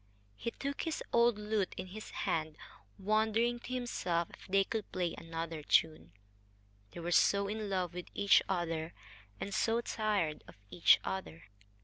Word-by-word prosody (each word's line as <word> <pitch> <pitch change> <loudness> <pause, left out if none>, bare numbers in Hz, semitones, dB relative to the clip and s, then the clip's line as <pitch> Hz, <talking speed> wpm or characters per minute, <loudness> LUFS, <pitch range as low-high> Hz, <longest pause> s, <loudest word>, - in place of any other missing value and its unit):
He 235 - -3
took 280 +4 -4
his 325 -2 -3
old 235 -2 +4
lute 210 -2 -1
in - - -4
his 210 +4 -9
hand 155 -1 -2 0.4
wondering 220 +4 +1
to 245 - -9
himself 175 -9 -1
if - - -14
they 195 +1 +4
could 220 +1 -4
play 175 -2 -1
another 165 -1 -5
tune. 155 - +2 0.8
They 140 - -8
were 175 +1 -3
so 200 +3 +4
in 210 0 -3
love 185 -3 -1
with 180 0 -6
each 200 -1 +5
other 165 -3 -2 0.4
and 200 - -4
so 225 +2 +2
tired 210 -10 -1
of - - -13 0.2
each 90 -1 +6
other. 90 -4 -5
195 Hz, 155 wpm, -33 LUFS, 165-215 Hz, 0.8 s, each